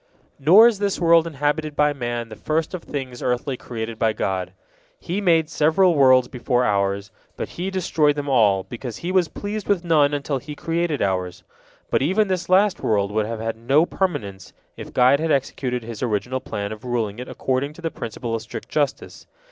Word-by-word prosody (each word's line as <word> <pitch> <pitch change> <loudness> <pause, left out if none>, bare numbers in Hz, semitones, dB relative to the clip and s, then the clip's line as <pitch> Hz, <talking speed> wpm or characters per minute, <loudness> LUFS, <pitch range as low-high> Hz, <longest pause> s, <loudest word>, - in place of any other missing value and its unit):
Nor 180 +11 +7
is 230 -4 +3
this 200 -1 -1
world 170 -1 +4
inhabited 150 0 -2
by 150 0 +3
man 120 -3 -4
the 110 - -9
first 155 - -2
of 180 - -4
things 130 -6 -6
earthly 125 +2 -1
created 115 -2 -6
by 110 -1 +2
God. 95 -3 -2 0.5
He 185 +4 -3
made 165 -5 +3
several 160 +4 +3
worlds 130 -4 +5
before 125 -1 0
ours, 100 -1 0 0.3
but - - -4
He 180 +3 -4
destroyed 165 -6 +1
them 145 -1 -4
all, 105 -8 +3
because 120 0 -7
He 180 - -1
was 185 -3 +3
pleased 205 +3 -5
with 195 -4 +1
none 150 -4 +4
until 145 -1 -2
He 145 +2 -9
created 165 -1 -1
ours. 90 -2 -2 0.5
But - - +2
even 190 +8 +2
this 180 -2 -2
last 195 +2 +4
world 100 -2 0
would 110 0 0
have 115 -1 -4
had 115 0 -2
no 135 +8 +3
permanence, 100 - -3 0.2
if - - -9
God 130 +3 +4
had 160 +1 -1
executed 125 -3 -1
His 115 -2 -8
original 125 +2 -1
plan 100 -5 -5
of 110 -1 -8
ruling 115 -3 -2
it 125 - -6
according 135 +3 -2
to 175 - -13
the 165 - -2
principle 115 +1 -5
of 115 - -1
strict 110 - -8
justice. 145 -3 -2
135 Hz, 195 wpm, -22 LUFS, 115-165 Hz, 0.5 s, Nor